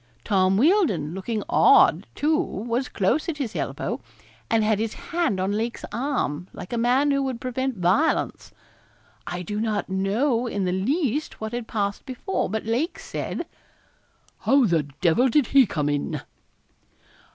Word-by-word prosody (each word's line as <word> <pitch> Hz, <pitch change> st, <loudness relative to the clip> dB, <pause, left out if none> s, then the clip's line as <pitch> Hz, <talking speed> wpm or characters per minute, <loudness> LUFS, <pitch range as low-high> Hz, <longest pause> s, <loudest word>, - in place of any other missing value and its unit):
Tom 190 Hz, -1 st, +2 dB
Wealdon 270 Hz, -, +2 dB
looking 210 Hz, +3 st, -3 dB
odd, 405 Hz, -2 st, +5 dB
too, 310 Hz, +2 st, +2 dB
was 245 Hz, -, -2 dB
close 225 Hz, -, 0 dB
at 310 Hz, -, -3 dB
his 250 Hz, -9 st, -4 dB
elbow, 140 Hz, -3 st, -3 dB, 0.5 s
and 225 Hz, -1 st, +3 dB
had 215 Hz, -1 st, +2 dB
his 220 Hz, 0 st, -2 dB
hand 335 Hz, -, -1 dB
on 190 Hz, +2 st, 0 dB
Lake's 225 Hz, +3 st, -2 dB
arm, 220 Hz, -, -2 dB
like 180 Hz, -, -8 dB
a -, -, 0 dB
man 255 Hz, +5 st, +3 dB
who 275 Hz, 0 st, +2 dB
would 260 Hz, -3 st, -2 dB
prevent 255 Hz, -1 st, -2 dB
violence. 185 Hz, -, +1 dB, 0.8 s
I 180 Hz, 0 st, -4 dB
do 210 Hz, +3 st, -4 dB
not 215 Hz, -3 st, -1 dB
know 225 Hz, +7 st, +1 dB
in 205 Hz, -4 st, -2 dB
the 180 Hz, -, 0 dB
least 275 Hz, -, -1 dB
what 220 Hz, 0 st, -4 dB
had 240 Hz, -2 st, -4 dB
passed 200 Hz, -2 st, -2 dB
before, 265 Hz, +9 st, -2 dB
but 220 Hz, +2 st, -3 dB
Lake 245 Hz, -, -1 dB
said -, -, -5 dB, 0.9 s
'How 275 Hz, -2 st, +4 dB
the 165 Hz, -7 st, +1 dB
devil 185 Hz, +9 st, +4 dB
did 280 Hz, +3 st, +3 dB
he 270 Hz, -4 st, +7 dB
come 150 Hz, -5 st, -1 dB
in?' 145 Hz, -1 st, -1 dB
225 Hz, 155 wpm, -24 LUFS, 190-270 Hz, 0.9 s, he